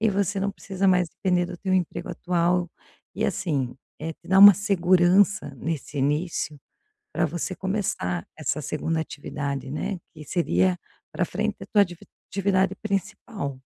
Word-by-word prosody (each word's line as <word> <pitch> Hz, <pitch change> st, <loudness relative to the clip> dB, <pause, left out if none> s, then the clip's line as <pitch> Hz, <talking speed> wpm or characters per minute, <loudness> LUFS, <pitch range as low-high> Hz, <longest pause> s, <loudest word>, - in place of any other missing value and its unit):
e 220 Hz, -, +3 dB
você 200 Hz, 0 st, 0 dB
não 200 Hz, +1 st, 0 dB
precisa 195 Hz, -1 st, -1 dB
mais 180 Hz, -2 st, +3 dB
depender 180 Hz, -2 st, +1 dB
do 175 Hz, -1 st, -7 dB
teu 190 Hz, -1 st, 0 dB
emprego 180 Hz, -3 st, -1 dB
atual, 175 Hz, 0 st, 0 dB, 0.4 s
e, -, -, -2 dB
assim, 140 Hz, -9 st, -1 dB, 0.3 s
eh, 160 Hz, +1 st, -3 dB
te -, -, -20 dB
dá 190 Hz, +1 st, +4 dB
uma 200 Hz, 0 st, +11 dB
segurança 185 Hz, -1 st, +3 dB
nesse 150 Hz, 0 st, -4 dB
início, 150 Hz, +2 st, -1 dB, 0.6 s
pra -, -, +1 dB
você 175 Hz, +3 st, -3 dB
começar 185 Hz, -, -2 dB
essa 155 Hz, 0 st, -2 dB
2.ª 160 Hz, +3 st, -2 dB
atividade, 140 Hz, -3 st, -4 dB
né, 185 Hz, +5 st, -3 dB, 0.2 s
que 155 Hz, -2 st, -10 dB
seria 180 Hz, +3 st, +1 dB, 0.3 s
pra -, -, 0 dB
frente -, -, -2 dB
a -, -, -6 dB
tua 205 Hz, -2 st, +4 dB
divi 175 Hz, -2 st, -9 dB, 0.2 s
atividade 195 Hz, -1 st, +1 dB
principal. 195 Hz, -, -4 dB
180 Hz, 155 wpm, -25 LUFS, 155-195 Hz, 0.6 s, uma